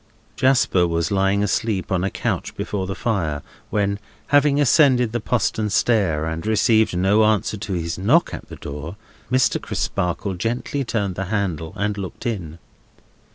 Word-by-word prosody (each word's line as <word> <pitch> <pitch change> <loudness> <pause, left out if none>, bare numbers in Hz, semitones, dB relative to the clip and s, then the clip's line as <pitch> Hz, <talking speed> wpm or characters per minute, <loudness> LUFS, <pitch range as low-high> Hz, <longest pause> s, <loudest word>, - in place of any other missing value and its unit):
Jasper 130 -9 +3
was 85 +1 -1
lying 100 +1 +2
asleep 105 -2 -1
on 90 -1 +1
a 95 - +1
couch - - -3
before 95 -2 -3
the 95 - -4
fire, 85 - -1 0.3
when, 100 -1 0 0.3
having 145 0 +4
ascended 130 -4 +4
the 120 - -1
postern 110 -1 0
stair, 100 -8 +2
and 80 0 -3
received 110 -2 +2
no 100 +4 +4
answer 110 0 +2
to 100 -1 -5
his 85 0 -3
knock 95 - +3
at - - -8
the - - -8
door, 75 +5 -7 0.4
Mr. 130 -1 +2
Crisparkle 90 +3 -2
gently 120 - -2
turned 105 -6 -1
the 95 +2 -4
handle 90 -6 -2
and 105 0 -2
looked 95 -2 -7
in. 90 -9 -3
100 Hz, 155 wpm, -22 LUFS, 90-115 Hz, 0.4 s, having